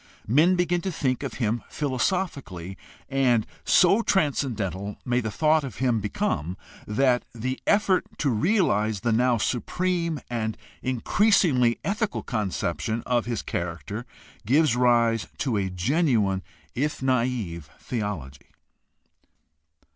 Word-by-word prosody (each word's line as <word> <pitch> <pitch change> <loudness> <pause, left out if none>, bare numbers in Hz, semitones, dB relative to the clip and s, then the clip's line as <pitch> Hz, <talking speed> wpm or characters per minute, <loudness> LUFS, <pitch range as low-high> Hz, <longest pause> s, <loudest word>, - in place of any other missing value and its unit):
Men 155 - +4
begin 175 0 +1
to 190 - -2
think 130 -6 -1
of - - -5
him 115 -1 -1
philosophically, 135 - -2 0.3
and 130 -5 +2 0.2
so 195 +5 +5
transcendental 115 - -1
may 125 -1 +1
the 115 -3 -2
thought 155 +6 +2
of 135 - -6
him 125 -3 +1
become 90 -4 -2 0.3
that 125 +3 +2
the 130 +3 -3
effort 200 -3 +3
to 140 - +1
realize 110 - +1
the 120 - +1
now 120 +2 +3
supreme 170 - -1
and 110 -2 -2 0.2
increasingly 130 - +3
ethical 210 +1 -1
conception 110 0 -2
of 120 -2 0
his 120 -3 -2
character 90 +7 -4 0.4
gives 135 +3 +3
rise 120 -2 +3
to 135 -8 -1
a 95 -2 0
genuine 105 - +1 0.3
if 145 +1 -2
naive 115 - -1
theology. 85 - -5
125 Hz, 115 wpm, -25 LUFS, 105-150 Hz, 0.4 s, so